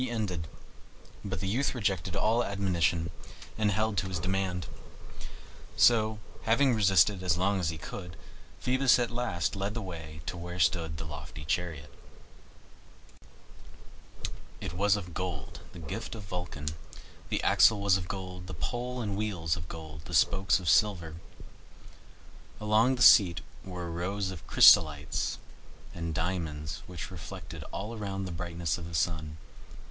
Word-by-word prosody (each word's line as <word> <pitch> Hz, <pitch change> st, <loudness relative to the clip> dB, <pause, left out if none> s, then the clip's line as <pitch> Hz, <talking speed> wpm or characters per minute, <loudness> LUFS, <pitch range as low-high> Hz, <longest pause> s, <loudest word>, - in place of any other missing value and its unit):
He 130 Hz, -, -1 dB
ended; 95 Hz, -9 st, -2 dB, 0.8 s
but 95 Hz, -3 st, -4 dB
the 95 Hz, -, -2 dB
youth 130 Hz, +8 st, 0 dB
rejected 95 Hz, -5 st, -1 dB
all 115 Hz, +3 st, +2 dB
admonition 90 Hz, -4 st, 0 dB, 0.4 s
and 110 Hz, -1 st, +1 dB
held 110 Hz, +1 st, 0 dB
to 95 Hz, -, -3 dB
his 95 Hz, -1 st, -3 dB
demand. 90 Hz, 0 st, -1 dB, 1.1 s
So, 110 Hz, -2 st, +5 dB, 0.2 s
having 125 Hz, +4 st, +3 dB
resisted 95 Hz, -2 st, +4 dB
as 90 Hz, -2 st, +1 dB
long 95 Hz, +2 st, +2 dB
as 85 Hz, -4 st, 0 dB
he 80 Hz, -, -4 dB
could, 85 Hz, +2 st, -8 dB, 0.4 s
Phoebus 130 Hz, +1 st, +4 dB
at 120 Hz, -1 st, 0 dB
last 115 Hz, -8 st, -1 dB
led 100 Hz, +2 st, -2 dB
the 115 Hz, -, -2 dB
way 80 Hz, -4 st, -8 dB
to 90 Hz, -, -4 dB
where 90 Hz, +1 st, -6 dB
stood 80 Hz, -2 st, +1 dB
the 80 Hz, -, -5 dB
lofty 75 Hz, 0 st, -8 dB
chariot. 75 Hz, -3 st, -2 dB, 2.7 s
It -, -, -5 dB
was 100 Hz, +3 st, +3 dB
of 90 Hz, -4 st, -6 dB
gold, 85 Hz, -7 st, -4 dB
the -, -, -12 dB
gift 95 Hz, +9 st, -5 dB
of 105 Hz, -, -8 dB
Vulcan; 90 Hz, -5 st, -5 dB, 0.6 s
the -, -, -1 dB
axle 110 Hz, -2 st, +5 dB
was 100 Hz, -2 st, +4 dB
of 90 Hz, -2 st, -2 dB
gold, 90 Hz, -1 st, -6 dB
the 90 Hz, -, -6 dB
pole 125 Hz, +9 st, -3 dB
and 105 Hz, -3 st, -2 dB
wheels 95 Hz, -7 st, -1 dB
of 85 Hz, 0 st, -7 dB
gold, 80 Hz, -2 st, -9 dB
the -, -, -4 dB
spokes 95 Hz, 0 st, +3 dB
of 90 Hz, -, -7 dB
silver. 85 Hz, -4 st, +3 dB, 1.4 s
Along 110 Hz, +4 st, +3 dB
the 125 Hz, -, +2 dB
seat 90 Hz, -5 st, +7 dB, 0.2 s
were 90 Hz, -2 st, -6 dB
rows 95 Hz, +3 st, -2 dB
of 80 Hz, -8 st, -10 dB
chrysolites 75 Hz, -2 st, +5 dB, 0.6 s
and 85 Hz, -2 st, -4 dB
diamonds 80 Hz, -4 st, -3 dB
which 90 Hz, 0 st, -7 dB
reflected 85 Hz, -6 st, -8 dB
all 105 Hz, +4 st, -5 dB
around 100 Hz, -3 st, -4 dB
the 90 Hz, -, -5 dB
brightness 85 Hz, -1 st, -2 dB
of 85 Hz, -, -7 dB
the 85 Hz, -, -6 dB
sun. 80 Hz, -1 st, -1 dB
90 Hz, 150 wpm, -30 LUFS, 80-105 Hz, 2.7 s, seat